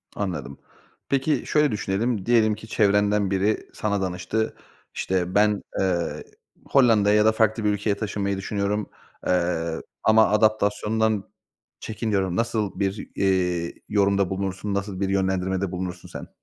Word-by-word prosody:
Anladım. 85 -9 -4 0.5
Peki, 140 +3 +1
şöyle 150 -4 +2
düşünelim, 105 +1 -1
diyelim 110 -3 +3
ki 110 - -12
çevrenden 105 -2 +2
biri 100 +3 0
sana 100 -2 -1
danıştı. 95 +4 -2 0.4
İşte, 90 0 -1
ben, 105 0 +3 0.2
eee, 90 -3 -1 0.4
Hollanda'ya 110 -6 +4
ya 105 0 +4
da 110 - +6
farklı 110 0 +1
bir 105 - +2
ülkeye 105 0 0
taşınmayı 100 -2 -2
düşünüyorum, 100 +1 -2 0.4
eee, 85 -2 0 0.2
ama 110 0 +5
adaptasyondan 110 0 +1 0.5
çekiniyorum. 100 -5 -2
Nasıl 110 -4 -1
bir, 100 +1 -2
eee, 90 -3 0 0.2
yorumda 100 -2 +2
bulunursun? 95 +1 -3
Nasıl 100 -1 -3
bir 95 -1 0
yönlendirmede 95 -1 0
bulunursun 90 -1 -5
sen? - - -8
100 Hz, 130 wpm, -24 LUFS, 95-110 Hz, 0.5 s, da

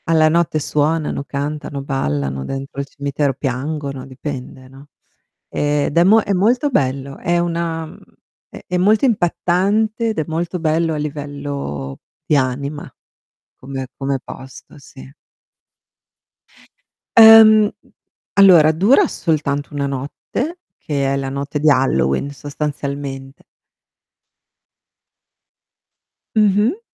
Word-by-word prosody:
Alla 160 -1 +4
notte 170 -1 +1
suonano, 150 0 -1
cantano, 145 0 -4
ballano 70 - -2
dentro 135 - -6
il 140 - -7
cimitero, 140 0 -2
piangono, 140 +1 -4
dipende, 130 -1 -8
no. 135 +2 -15 0.6
Ed 145 -1 -1
è 170 - +6
mo 215 +5 +5
è 200 - -4
molto 240 +9 +2
bello, 135 - -1
è 175 +1 0
una 170 -1 -2
mhmm, - - -14 0.5
è - - -12
è 180 - -1
molto 210 +7 +3
impattante 210 +2 +1
ed 220 - -2
è - - +1
molto 170 +2 -3
bello 160 0 0
a - - -3
livello 140 - -5 0.3
di 150 - +2
anima 140 +3 -3 0.7
come 135 0 -6
come 135 0 -2
posto, 130 +3 -12
sì. 135 0 -14 2.0
Ehm, 220 -1 +9 0.6
allora 180 -6 +7
dura 210 - +4
soltanto 145 - -2
1 145 -1 -2
notte, 145 - -4 0.2
che 140 -2 -2
è - - 0
la 135 -1 -3
notte 140 +2 -4
di 155 +1 +3
Halloween, 130 - +1
sostanzialmente. 140 -1 -6 2.9
Mh-mh. 215 - +2
145 Hz, 110 wpm, -18 LUFS, 135-175 Hz, 2.9 s, Ehm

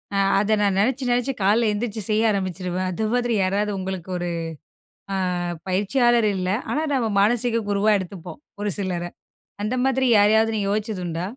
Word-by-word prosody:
அ - - +1 0.2
அத 210 +2 0
நான் 200 -2 +2
நெனச்சு, 255 +4 +1
நெனச்சு 245 +2 +1
காலையில 220 +3 +3
எழுந்திரிச்சி 215 0 -3
செய்ய 220 +1 +3
ஆரம்பிச்சுருவேன். 185 -1 -2
அது 215 +5 -2
மாதிரி 240 -1 0
யாராவது 205 +3 0
உங்களுக்கு 190 -1 -5
ஒரு, 175 0 -3 0.8
அ 195 - 0 0.5
பயிற்சியாளர் 230 +4 +2
இல்ல, 185 -1 -2 0.2
ஆனா, 305 - 0
நம்ம 240 -4 +1
மானசீக 230 +2 +1
குருவா 205 +1 +2
எடுத்துப்போம். 180 - -8 0.2
ஒரு 210 - -1
சிலர 180 -3 -2 0.6
அந்த 215 +4 -1
மாதிரி 265 0 +1
யாரையாவது 220 +2 +4
நீங்க 200 -2 -1
யோசிச்சதுண்டா? 185 -6 -3
210 Hz, 155 wpm, -23 LUFS, 190-230 Hz, 0.8 s, யாரையாவது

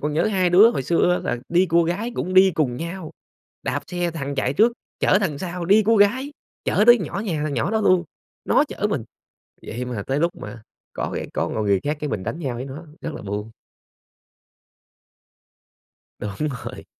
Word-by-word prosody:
còn 150 +1 -2
nhớ 155 - +1
hai 190 -4 +1
đứa 205 +6 +8
hồi 135 - -2
xưa 175 +4 +2
là 120 - 0
đi 175 +2 +3
cua 170 0 +3
gái 195 +8 -2
cũng 185 +1 -3
đi 190 0 +7
cùng 140 -7 0
nhau, 170 +2 -6 0.5
đạp - - -2
xe 175 -1 -2
thằng 140 -3 -4
chạy 135 0 0
trước, 225 +9 +4 0.3
chở - - +4
thằng 155 -8 -1
sau 180 -1 -4
đi 205 +4 +5
cua 225 +2 +4
gái, 255 +8 +3 0.3
chở 205 - +2
tới 240 0 +9
nhỏ 185 +3 -4
nhà 160 -7 -1
thằng 155 -2 -2
nhỏ 170 +8 -1
đó 220 - +1
luôn, 185 -3 +4 0.4
nó - - +4
chở 210 -5 -2
mình. 140 - -1 0.6
Vậy 125 +2 -5
mà 120 -5 -4
tới 135 +2 0
lúc 170 +2 +2
mà 110 +1 -9 0.3
có - - -3
cái - - -4
có - - -1
một 110 - -2
người 100 -2 +2
khác 145 +1 -1
cái 150 - -3
mình 100 -4 -3
đánh 115 +9 -4
nhau 135 -7 -3
với 125 +2 -5
nó, 145 +5 -8 0.2
rất 165 - -4
là - - -7
buồn. 105 +2 -5 2.7
Đúng 105 +9 -3 0.2
rồi. - - -8
165 Hz, 205 wpm, -22 LUFS, 135-190 Hz, 2.7 s, tới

